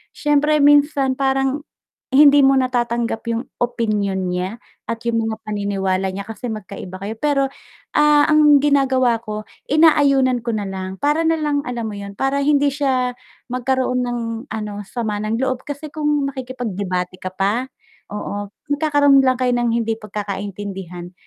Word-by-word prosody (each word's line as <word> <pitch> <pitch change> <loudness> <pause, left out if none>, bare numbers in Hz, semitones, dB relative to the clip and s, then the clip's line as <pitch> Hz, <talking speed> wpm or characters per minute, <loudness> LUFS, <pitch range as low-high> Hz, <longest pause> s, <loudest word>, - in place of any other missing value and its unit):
siyempre 295 0 +2
minsan 285 -2 +4
parang, 270 +2 0 0.4
hindi 285 +1 +6
mo 270 0 +5
natatanggap 240 -3 0
yung 230 +2 -1 0.2
opinyon 205 -6 -1
niya 185 +5 -3 0.3
at 230 - -1
yung 230 -1 +1
mga 220 0 -6
paniniwala 195 -2 -1
niya 195 +1 -5
kasi 225 +3 -7
magkaiba 200 -3 -7
kayo, 210 - -3
pero, 290 -2 +2 0.5
ah, 295 -1 +5
ang 295 -2 +5
ginagawa 260 -5 +3
ko 215 -1 -6 0.2
inaayunan 275 -5 +4
ko 230 -1 -2
nalang 190 -2 -4
para 295 +5 +1
nalang 310 -3 +1
alam 240 -2 -3
mo 215 - -4
'yun, 200 0 -8
para 270 +3 0
hindi 285 0 +3
siya 260 -3 0 0.4
magkaroon 255 0 0
ng 240 -1 -2 0.3
ano 210 -1 -5
sama 215 -3 -3
ng 215 +1 -1
loob 260 0 -1
kasi 290 +1 -6
kung 295 -2 0
makikipag-debate 200 -9 -4
ka 185 - -4
pa, 200 +7 -1 0.4
oo 205 0 -5 0.2
magkakaroon 285 -2 +4
lang 260 -1 +3
kayo 250 -1 +1
ng 240 -1 +1
hindi 225 -1 0
pagkakaintindihan, 195 -3 -6
245 Hz, 145 wpm, -20 LUFS, 205-280 Hz, 0.5 s, hindi